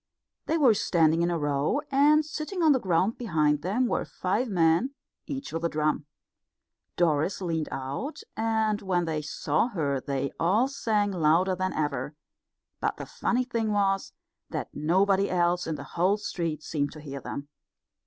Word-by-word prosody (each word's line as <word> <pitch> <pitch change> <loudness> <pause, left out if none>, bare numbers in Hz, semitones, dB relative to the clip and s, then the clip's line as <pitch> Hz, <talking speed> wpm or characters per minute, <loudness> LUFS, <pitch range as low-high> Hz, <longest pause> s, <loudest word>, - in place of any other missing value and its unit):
They 325 - +2
were 265 -8 +6
standing 165 -5 +2
in 170 - +2
a 170 - 0
row, 145 - 0
and 295 +3 +5
sitting 320 +4 -3
on 315 - +6
the 265 - +4
ground 190 +2 +1
behind 155 -10 +1
them 210 +9 +1
were - - 0
five 210 +7 -1
men, 175 +8 +2 0.3
each 275 - -5
with 165 0 -3
a 170 - +2
drum. 155 -1 0 0.9
Doris 160 +1 +1
leaned 165 -4 -2
out, 140 - -4
and 220 -2 0
when 180 -3 0
they 155 -2 -2
saw 150 +5 0
her 145 - -1
they 140 0 -2
all 205 +10 +3
sang 215 -7 0
louder 175 +2 +3
than 185 +1 -2
ever; 150 0 -2 0.6
but - - -1
the - - -6
funny 245 +1 0
thing 230 -4 -1
was 195 -1 +1 0.4
that - - -5
nobody 190 +6 +2
else 175 -1 +1
in 160 - -1
the - - -7
whole 185 +4 +1
street 165 -7 -3
seemed 145 -2 -2
to 155 - -10
hear 140 -2 -7
them. 140 +1 -6
180 Hz, 165 wpm, -27 LUFS, 155-220 Hz, 0.9 s, were